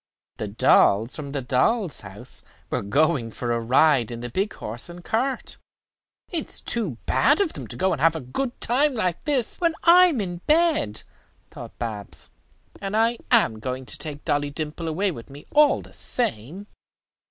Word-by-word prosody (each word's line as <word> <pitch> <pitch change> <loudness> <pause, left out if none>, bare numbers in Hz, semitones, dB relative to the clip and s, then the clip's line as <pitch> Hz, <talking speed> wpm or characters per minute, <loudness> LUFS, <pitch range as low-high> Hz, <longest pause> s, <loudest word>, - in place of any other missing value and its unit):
The - - -4
dolls 110 +5 +4
from 145 -2 -6
the 140 -2 -3
dolls' 155 - +1
house 105 +5 -5 0.3
were - - 0
going 140 +2 +1
for 120 +2 -4
a 120 - +1
ride 125 +1 +3
in 120 -1 -6
the 120 0 -6
big 195 - -1
horse 115 +9 -6
and 175 0 -10
cart. 255 +4 -1 0.7
"It 330 -5 0
is - - 0
too 200 - -2
bad 290 +3 +3
of 390 -6 +1
them - - -7
to - - -6
go 190 0 +2
and 150 - -2
have 165 +1 +4
a - - -2
good 240 - -4
time 275 +3 +2
like 180 -6 -1
this 275 -3 0
when 335 -2 +2
I 360 +2 +8
am 305 -9 -1
in 180 -4 -3
bed," 310 - +2 0.5
thought - - -10
Babs, 105 -4 -5 0.5
"and 200 +2 -2
I 230 +1 +2
am 165 - +3
going 130 +2 -4
to - - -5
take 150 -2 -7
Dolly 145 0 0
Dimple 155 +2 -5
away 185 +5 0
with 115 -6 -10
me 140 +2 -12
all 300 0 +4
the - - -16
same." 180 - -2
160 Hz, 185 wpm, -24 LUFS, -, 0.7 s, I